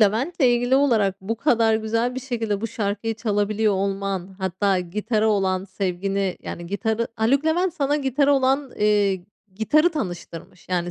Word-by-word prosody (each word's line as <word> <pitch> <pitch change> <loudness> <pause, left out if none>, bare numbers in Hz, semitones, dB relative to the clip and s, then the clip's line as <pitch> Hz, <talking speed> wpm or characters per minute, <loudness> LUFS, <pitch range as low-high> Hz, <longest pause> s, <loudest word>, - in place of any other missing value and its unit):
Levent'le 230 - +1
ilgili 245 -1 +3
olarak 220 -9 +2
bu 215 +4 -3
kadar 230 -3 +3
güzel 230 +3 0
bir 260 - -4
şekilde 225 -6 -2
bu 230 - -1
şarkıyı 215 0 -2
çalabiliyor 215 -1 0
olman 195 -1 -2
hatta 190 0 0
gitara 210 +5 -1
olan 190 -2 +1
sevgini 195 0 -2
yani 170 - -6
gitarı 220 +4 -1
Haluk 250 +6 +2
Levent 345 +2 +1
sana 290 -3 +1
gitara 280 0 +2
olan, 270 0 +1
eee 205 -3 +2 0.3
gitarı 305 - +3
tanıştırmış 175 - -7
yani 175 -1 -1
215 Hz, 150 wpm, -23 LUFS, 195-250 Hz, 0.3 s, ilgili